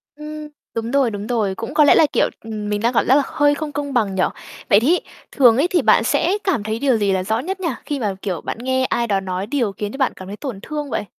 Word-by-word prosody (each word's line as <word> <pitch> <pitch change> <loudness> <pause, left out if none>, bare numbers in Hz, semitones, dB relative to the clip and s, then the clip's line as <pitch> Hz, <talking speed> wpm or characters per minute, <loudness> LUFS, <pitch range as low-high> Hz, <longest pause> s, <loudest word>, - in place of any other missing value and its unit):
Ừm. 300 0 -8 0.3
Đúng 230 +1 -3
rồi, 275 -4 +2
đúng 205 0 -5
rồi. 215 -6 0
Cũng 225 0 -6
có 305 - +5
lẽ 290 - +6
là, 315 - +6
kiểu, - - +2
ừm, 215 -2 -5
mình 205 0 -1
đang 235 +2 +1
cảm - - +2
giác 260 - +6
là 285 - +4
hơi 290 -1 +2
không 300 0 -5
công 285 -1 -4
bằng 210 -6 +1
nhỉ. 185 - +2 0.5
Vậy 200 - +6
thí 315 +11 +3 0.3
thường 240 -4 +5
ấy 290 +6 +3
thì 360 -1 +1
bạn - - +4
sẽ 370 +5 +1
cảm 370 - 0
thấy 220 +1 -3
điều 265 -3 +2
gì 205 -2 +1
là 190 -1 0
rõ 220 +4 0
nhất 380 +9 -4
nhỉ, 355 -3 -1 0.2
khi 290 -2 -3
mà, 205 -5 -2
kiểu, 185 -5 -3
bạn - - -5
nghe 260 +1 0
ai 235 -2 0
đó 200 -3 +1
nói 190 +1 -4
điều 240 -5 0
khiến 205 +1 -5
cho 270 - -8
bạn 265 -3 +1
cảm 185 - -10
thấy 205 +2 -7
tổn 250 -7 -6
thương 295 +1 -5
vậy? 210 - -2
240 Hz, 285 wpm, -20 LUFS, 205-290 Hz, 0.5 s, lẽ